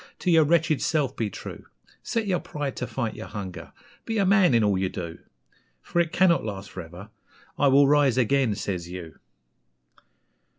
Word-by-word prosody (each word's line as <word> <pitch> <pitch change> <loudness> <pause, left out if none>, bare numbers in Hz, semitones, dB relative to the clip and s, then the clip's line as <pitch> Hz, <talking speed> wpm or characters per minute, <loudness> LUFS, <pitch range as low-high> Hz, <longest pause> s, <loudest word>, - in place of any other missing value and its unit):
To 180 - 0
your 160 -2 +6
wretched 160 -1 +2
self 145 -5 0
be 110 -2 -2
true; - - -9 0.3
Set 230 -2 -2
your 185 -3 0
pride 145 -3 -5
to 125 - -3
fight 115 -4 -3
your - - -8
hunger! 95 -5 -7 0.3
Be 225 - -3
a 200 - +2
MAN 185 - +4
in 115 - +4
all 105 -2 +2
you 95 0 0
do! 85 -3 -7 0.6
For 175 - -1
it 170 -2 +1
cannot 180 -2 +3
last 100 -2 -6
for 90 - -6
ever 90 +6 -11 0.5
'I 145 - +4
will 140 +1 +6
rise 140 -4 +3
again!' 130 -2 +2
says 90 -4 -4
you. 90 -3 -9
130 Hz, 180 wpm, -25 LUFS, 100-160 Hz, 0.6 s, your